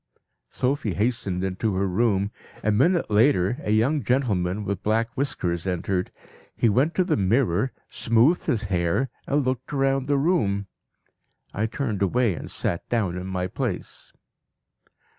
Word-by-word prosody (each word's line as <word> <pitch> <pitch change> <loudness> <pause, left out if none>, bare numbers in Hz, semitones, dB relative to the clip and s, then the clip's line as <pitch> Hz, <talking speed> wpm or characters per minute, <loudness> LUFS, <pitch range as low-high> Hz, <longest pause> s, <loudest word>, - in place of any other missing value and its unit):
"Sophie 125 -6 -1
hastened 100 -5 -1
into 95 +2 -1
her 95 +1 +1
room. 100 0 +1 0.3
A 110 - +2
minute 160 - +2
later 110 -1 +3
a - - -5
young 120 +8 +2
gentleman 105 -6 0
with 100 -1 -3
black 115 +2 +1
whiskers 90 -11 -2
entered. 90 0 -1 0.4
He 115 - +3
went 135 +10 +2
to 185 - +3
the 175 -3 +1
mirror, 110 +2 +1 0.2
smoothed 120 +9 +2
his 115 - +1
hair, 95 +6 0 0.2
and 145 -1 +1
looked 130 0 -2
round 135 -1 +1
the 145 -1 +2
room. 110 - +1 0.9
I 110 +2 0
turned 110 -4 -3
away 115 +2 +2
and - - -7
sat 85 - -3
down 105 -7 0
in 90 +1 -5
my 90 -1 -2
place. 90 - -5
110 Hz, 145 wpm, -25 LUFS, 95-130 Hz, 0.9 s, later